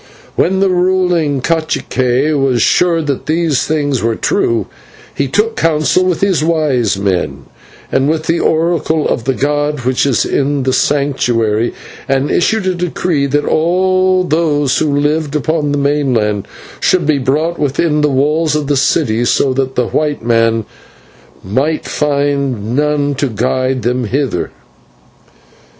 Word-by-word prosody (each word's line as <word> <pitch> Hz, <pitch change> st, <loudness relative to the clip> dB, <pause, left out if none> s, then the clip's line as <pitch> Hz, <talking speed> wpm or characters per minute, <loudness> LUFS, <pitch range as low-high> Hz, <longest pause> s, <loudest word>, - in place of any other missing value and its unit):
When 190 Hz, +2 st, +1 dB
the 195 Hz, -, +3 dB
ruling 180 Hz, -6 st, +1 dB
/cacique/ 140 Hz, -3 st, 0 dB
was 135 Hz, -4 st, +1 dB
sure 170 Hz, -2 st, +2 dB
that 145 Hz, -1 st, -3 dB
these 160 Hz, -3 st, 0 dB
things 145 Hz, -4 st, 0 dB
were 115 Hz, 0 st, 0 dB
true, 115 Hz, -2 st, 0 dB, 0.5 s
he 140 Hz, -, -1 dB
took 215 Hz, -, 0 dB
counsel 160 Hz, +3 st, +1 dB
with 180 Hz, -3 st, -1 dB
his 190 Hz, -6 st, +1 dB
wise 150 Hz, -10 st, +1 dB
men 95 Hz, -3 st, -2 dB, 0.5 s
and 135 Hz, +2 st, +1 dB
with 160 Hz, 0 st, 0 dB
the 165 Hz, +1 st, 0 dB
oracle 160 Hz, -1 st, +1 dB
of 115 Hz, -, -2 dB
the 135 Hz, 0 st, 0 dB
god 145 Hz, 0 st, -1 dB
which 130 Hz, +2 st, 0 dB
is 130 Hz, -, +1 dB
in 140 Hz, 0 st, 0 dB
the 130 Hz, 0 st, 0 dB
Sanctuary, 120 Hz, -6 st, 0 dB, 0.3 s
and 135 Hz, +1 st, +1 dB
issued 215 Hz, +3 st, +1 dB
a 185 Hz, -, +1 dB
decree 175 Hz, -4 st, -1 dB
that 145 Hz, +1 st, 0 dB
all 185 Hz, +2 st, +2 dB
those 150 Hz, -4 st, +1 dB
who 155 Hz, -, +1 dB
lived 145 Hz, +1 st, 0 dB
upon 150 Hz, 0 st, 0 dB
the 145 Hz, -, 0 dB
mainland 130 Hz, -8 st, 0 dB, 0.3 s
should 180 Hz, -4 st, +2 dB
be 150 Hz, -2 st, +2 dB
brought 150 Hz, +6 st, -1 dB
within 150 Hz, +2 st, 0 dB
the 150 Hz, -, +2 dB
walls 150 Hz, +3 st, +1 dB
of 150 Hz, -1 st, -1 dB
the 145 Hz, 0 st, 0 dB
city, 120 Hz, -4 st, +1 dB
so 130 Hz, +2 st, +1 dB
that 135 Hz, 0 st, -2 dB
the 125 Hz, -2 st, 0 dB
white 150 Hz, -5 st, -1 dB
men 115 Hz, -1 st, +2 dB, 0.8 s
might 135 Hz, +11 st, -1 dB
find 140 Hz, -6 st, -1 dB
none 145 Hz, 0 st, +1 dB
to 140 Hz, +1 st, -1 dB
guide 130 Hz, +2 st, -1 dB
them 125 Hz, 0 st, -1 dB
thither. 130 Hz, -5 st, -1 dB
145 Hz, 145 wpm, -14 LUFS, 130-160 Hz, 0.8 s, the